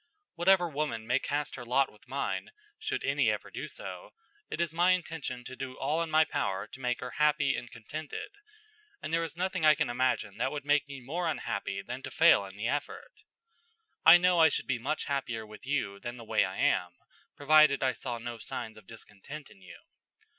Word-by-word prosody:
Whatever 180 Hz, +1 st, +4 dB
woman 145 Hz, -8 st, -3 dB
may 125 Hz, +3 st, +2 dB
cast 145 Hz, +1 st, -2 dB
her 125 Hz, -, -7 dB
lot 130 Hz, +3 st, +2 dB
with -, -, -22 dB
mine, -, -, -2 dB, 0.3 s
should -, -, -3 dB
any -, -, +2 dB
ever -, -, -3 dB
do -, -, -5 dB
so, -, -, -8 dB, 0.3 s
it -, -, -5 dB
is 170 Hz, -2 st, 0 dB
my 175 Hz, +2 st, +4 dB
intention 160 Hz, -8 st, -4 dB
to 130 Hz, -, -8 dB
do 130 Hz, -1 st, -6 dB
all 150 Hz, +5 st, 0 dB
in 165 Hz, -, -2 dB
my 155 Hz, 0 st, +5 dB
power 100 Hz, -8 st, -2 dB
to -, -, -12 dB
make 125 Hz, -2 st, -1 dB
her 125 Hz, -, -5 dB
happy 150 Hz, -1 st, +3 dB
and 120 Hz, +1 st, -6 dB
contented; 150 Hz, -, -7 dB, 0.7 s
and 160 Hz, -, -6 dB
there 165 Hz, 0 st, +2 dB
is 165 Hz, 0 st, -6 dB
nothing 185 Hz, -1 st, -1 dB
I 155 Hz, -1 st, +7 dB
can 150 Hz, -4 st, 0 dB
imagine 120 Hz, -5 st, 0 dB
that 130 Hz, -, 0 dB
would 145 Hz, -1 st, -5 dB
make 145 Hz, -1 st, +3 dB
me 140 Hz, -2 st, -8 dB
more 165 Hz, +8 st, -2 dB
unhappy 100 Hz, -10 st, -3 dB
than 125 Hz, +4 st, -6 dB
to -, -, -6 dB
fail 160 Hz, -11 st, +5 dB
in 95 Hz, +1 st, -11 dB
the 110 Hz, +2 st, -2 dB
effort. 145 Hz, -, -4 dB, 0.8 s
I -, -, +10 dB
know 180 Hz, 0 st, +3 dB
I 160 Hz, -1 st, +8 dB
should -, -, -1 dB
be 125 Hz, -3 st, -1 dB
much 150 Hz, +6 st, -2 dB
happier 120 Hz, -5 st, -2 dB
with 105 Hz, +4 st, -13 dB
you 115 Hz, -9 st, -1 dB
than 120 Hz, +3 st, -6 dB
the 115 Hz, -, -9 dB
way 110 Hz, -, +2 dB
I -, -, -6 dB
am, 90 Hz, -1 st, +1 dB, 0.4 s
provided 155 Hz, -1 st, +5 dB
I 130 Hz, -, +3 dB
saw 120 Hz, -3 st, -5 dB
no 115 Hz, 0 st, -6 dB
signs 110 Hz, 0 st, -5 dB
of 100 Hz, -3 st, -16 dB
discontent 115 Hz, +7 st, -10 dB
in 95 Hz, -, -18 dB
you. 90 Hz, -2 st, -12 dB
140 Hz, 210 wpm, -30 LUFS, 120-155 Hz, 0.8 s, I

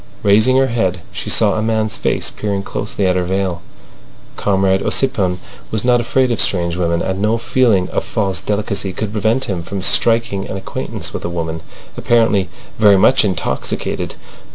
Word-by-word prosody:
Raising 110 Hz, +6 st, +4 dB
her 135 Hz, -, +4 dB
head, 95 Hz, -8 st, -1 dB
she -, -, -6 dB
saw -, -, +4 dB
a 110 Hz, -, -1 dB
man's 110 Hz, -1 st, 0 dB
face -, -, -1 dB
peering 100 Hz, -2 st, -3 dB
closely 100 Hz, 0 st, -3 dB
at 90 Hz, -1 st, +2 dB
her 90 Hz, -, +1 dB
veil. 95 Hz, -1 st, -2 dB, 0.7 s
Comrade 95 Hz, -1 st, +1 dB
Ossipon 95 Hz, -9 st, +1 dB, 0.3 s
was 110 Hz, +1 st, -2 dB
not 120 Hz, -1 st, +4 dB
afraid 130 Hz, +2 st, +1 dB
of 115 Hz, -, 0 dB
strange 85 Hz, -3 st, +1 dB
women, 85 Hz, -1 st, 0 dB
and 95 Hz, +1 st, -2 dB
no 110 Hz, +2 st, +2 dB
feeling 115 Hz, -6 st, +2 dB
of -, -, -1 dB
false 95 Hz, -3 st, -2 dB
delicacy 100 Hz, -2 st, -2 dB
could 105 Hz, +1 st, -3 dB
prevent 110 Hz, +4 st, 0 dB
him 95 Hz, -4 st, -3 dB
from 95 Hz, +3 st, -5 dB
striking 115 Hz, -2 st, +2 dB
an 95 Hz, -, -5 dB
acquaintance 95 Hz, -, -5 dB
with -, -, -5 dB
a -, -, -3 dB
woman 80 Hz, -2 st, -4 dB, 0.3 s
apparently 110 Hz, -6 st, +2 dB, 0.3 s
very 105 Hz, -3 st, +6 dB
much 120 Hz, +7 st, +4 dB
intoxicated. 95 Hz, -6 st, -2 dB
100 Hz, 170 wpm, -17 LUFS, 95-110 Hz, 0.7 s, very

